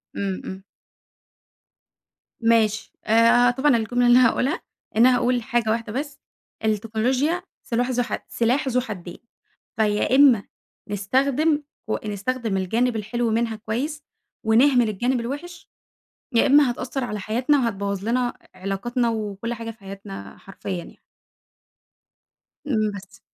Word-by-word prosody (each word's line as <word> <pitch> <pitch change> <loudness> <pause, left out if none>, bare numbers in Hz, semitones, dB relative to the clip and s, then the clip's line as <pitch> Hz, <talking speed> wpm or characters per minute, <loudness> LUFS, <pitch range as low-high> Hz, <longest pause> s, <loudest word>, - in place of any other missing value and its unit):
امم، 195 -2 -2
امم. 190 +1 -7 1.8
ماشي. 225 -2 +2
آآ، 230 +2 +5
طبعًا 265 0 +3
الجملة 245 +2 +1
اللي 240 +1 +7
هاقولها، 255 +6 +2 0.4
إني 245 +3 +7
هاقول 245 0 +2
حاجة 240 -2 0
واحدة 225 -1 -1
بس، 285 +2 -4 0.5
التكنولوجيا 235 - 0 0.2
سلاح 245 +2 -1
ذو 245 0 +1
ح - - -5
سلاح 245 +4 0
ذو 250 -1 +2
حدين 185 -7 -7 0.6
فيا 210 +3 +2
إما 265 -7 +6 0.5
نستخدم 275 +9 +1 0.2
و 215 - 0
نستخدم 215 +1 -2
الجانب 230 +6 0
الحلو 230 +2 -1
منها 225 0 0
كويس، 245 +8 -4 0.4
ونهمل 240 +1 +4
الجانب 245 +5 0
الوحش، 290 +9 -6 0.6
يا 230 - +4
إما 280 -2 +5
هتأثر 255 +2 -4
على 210 -3 -4
حياتنا 245 +9 +1
وهتبوظ 200 -4 -2
لنا 245 +1 0 0.2
ع-علاقاتنا 200 +6 -1
وكل 215 +1 -3
حاجة 230 -1 -6
في 225 - -20
حياتنا 195 - -9
حرفيًا 195 0 -8
يعني. 175 - -8 1.7
امم، 215 -6 +1
بس. 200 -1 -11
230 Hz, 125 wpm, -23 LUFS, 210-255 Hz, 1.8 s, اللي